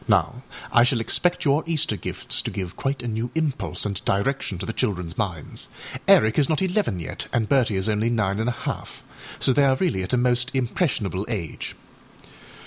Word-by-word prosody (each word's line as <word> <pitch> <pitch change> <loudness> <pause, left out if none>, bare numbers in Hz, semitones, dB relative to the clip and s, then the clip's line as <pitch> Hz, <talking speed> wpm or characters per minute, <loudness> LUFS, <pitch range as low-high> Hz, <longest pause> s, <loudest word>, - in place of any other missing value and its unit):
Now 105 +3 +2 0.3
I 120 - +6
shall 125 -1 +3
expect 175 +11 +1
your 145 +2 +3
Easter 160 -3 +1
gifts - - -1
to - - -3
give 95 -2 -5
quite 135 -1 -2
a - - -3
new 115 +2 -2
impulse 155 -8 -1
and 100 -1 -3
direction 100 0 0
to - - -5
the 115 - -3
childrenâs 90 -9 -1
minds; 90 -8 -3 0.4
Eric 110 +5 +6
is 140 - +3
not 155 - +2
eleven 190 - 0
yet, 85 - -5
and 115 -3 +1
Bertie 125 -5 +3
is 95 - 0
only 110 +1 +1
nine 105 -4 0
and 115 +2 +1
a 120 - -5
half, - - -5 0.4
so 130 - +3
they 145 - +4
are 135 -1 +4
really 155 - 0
at 95 - -4
a - - +4
most 125 +2 +1
impressionable 120 - 0
age. 95 -9 -4
120 Hz, 195 wpm, -24 LUFS, 100-135 Hz, 0.4 s, I